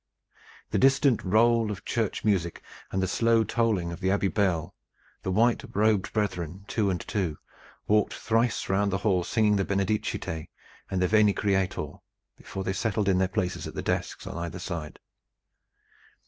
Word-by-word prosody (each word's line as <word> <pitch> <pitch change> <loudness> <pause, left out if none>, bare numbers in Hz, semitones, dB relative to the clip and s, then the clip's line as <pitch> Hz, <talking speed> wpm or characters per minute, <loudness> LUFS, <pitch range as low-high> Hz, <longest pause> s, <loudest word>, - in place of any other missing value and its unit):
The - - +1
distant 135 -2 +4
roll 115 +3 +3
of 105 -1 -6
church 115 -3 -1
music 90 -5 0 0.3
and 95 0 0
the - - +1
slow 115 +4 +3
tolling 110 -7 0
of 85 - -7
the 95 -1 0
Abbey 100 0 +2
bell; 95 -7 0 0.5
the - - -3
white 115 +7 +2
robed 105 -2 +2
brethren, 95 -3 -2
two 105 -3 0
and 90 -2 -1
two, 90 -7 -2 0.5
walked 105 -1 +2
thrice 115 +1 0
round 100 +1 +1
the 95 - +1
hall 95 -4 +3
singing 105 +2 +2
the 100 - +1
"Benedicite" 100 -5 -2 0.4
and 95 -1 0
the - - +3
"Veni, 105 0 +4
Creator" 95 -2 0 0.5
before 95 - -7
they 95 - -1
settled 105 0 -1
in 95 -2 +3
their 95 - +3
places 90 -1 -2
at - - -9
the - - -3
desks - - -2
on 85 - -5
either 85 0 -4
side. 85 -4 -5
100 Hz, 165 wpm, -27 LUFS, 90-110 Hz, 0.5 s, distant